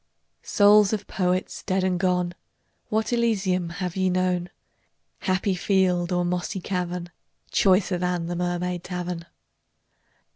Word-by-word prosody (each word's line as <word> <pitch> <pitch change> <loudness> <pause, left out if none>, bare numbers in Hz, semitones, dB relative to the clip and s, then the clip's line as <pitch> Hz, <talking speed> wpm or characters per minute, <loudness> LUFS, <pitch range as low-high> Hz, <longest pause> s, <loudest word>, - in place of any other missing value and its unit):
Souls 205 0 +5
of 210 -2 -2
Poets 185 -1 -1
dead 190 0 0
and 185 -1 +1
gone, 180 -1 +1 0.6
What 220 +2 0
Elysium 195 -7 +1
have 180 0 -4
ye 190 -1 +1
known, 180 -1 0 0.7
Happy 190 +1 0
field 180 -2 +1
or 180 0 +1
mossy 180 +2 -2
cavern, 180 -1 -3 0.4
Choicer 185 -2 +3
than 180 -1 -1
the 175 +1 -3
Mermaid 175 0 -2
Tavern? 180 -2 -5
180 Hz, 120 wpm, -25 LUFS, 175-190 Hz, 0.7 s, Souls